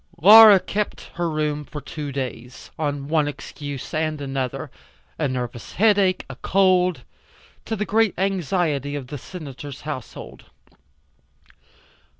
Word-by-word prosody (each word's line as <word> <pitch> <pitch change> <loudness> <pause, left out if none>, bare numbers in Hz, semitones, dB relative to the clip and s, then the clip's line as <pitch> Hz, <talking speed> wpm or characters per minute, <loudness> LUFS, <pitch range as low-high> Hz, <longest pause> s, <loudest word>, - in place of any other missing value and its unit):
Laura 210 +3 +10
kept 210 +3 -4
her 170 0 -2
room 150 -1 -2
for 150 +1 -8
two 150 0 -6
days, 130 -2 -6
on 145 -2 -2
one 155 -1 +1
excuse 145 -1 -7
and 155 -1 -1
another 135 -3 -4 0.5
a 150 - +1
nervous 125 -2 -5
headache, 200 -3 +3
a - - -8
cold 185 -2 +2 0.6
to 225 - -2
the 210 0 -2
great 220 -1 +2
anxiety 175 -6 -1
of 140 -3 -5
the 145 - -5
Senator's 145 -4 -9
household. 145 -5 -8
150 Hz, 125 wpm, -22 LUFS, 140-185 Hz, 0.6 s, Laura